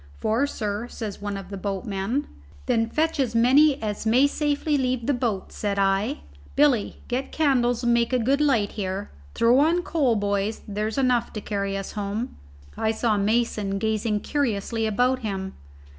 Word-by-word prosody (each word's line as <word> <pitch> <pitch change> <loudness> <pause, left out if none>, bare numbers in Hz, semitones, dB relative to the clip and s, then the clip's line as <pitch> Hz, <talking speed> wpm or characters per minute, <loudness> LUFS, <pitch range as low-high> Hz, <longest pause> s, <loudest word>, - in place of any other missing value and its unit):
"Four, 230 - +1
sir," 210 -2 -3
says 215 -5 -6
one 205 -1 -3
of 195 0 -9
the 200 - -4
boatmen. 200 +6 -2 0.4
"Then 225 0 +1
fetch 320 +3 0
as 245 -4 0
many 270 +5 +5
as 210 -1 -3
may 240 +5 +4
safely 295 +1 0
leave 255 -3 0
the 285 - +2
boat," 230 -6 -2
said 205 -1 -2
I. 195 +6 +1 0.3
"Billy, 275 -7 +2
get 255 +2 -2
candles 250 -6 +2
and 240 0 +3
make 235 +1 +2
a 255 - +3
good 265 +5 +1
light 230 -9 +2
here. 195 -1 -4 0.2
Throw 240 +3 +4
on 335 +4 +3
coal, 280 -10 +1
boys; 205 +1 -1
there's 210 +2 -3
enough 250 -3 +2
to 215 - -4
carry 200 -1 -2
us 195 - -5
home." 210 +3 -4 0.4
I 220 - 0
saw 220 0 +1
Mason 210 -1 0
gazing 215 0 0
curiously 225 -5 -1
about 250 +4 +2
him. 195 -4 -4
225 Hz, 170 wpm, -25 LUFS, 205-260 Hz, 0.4 s, many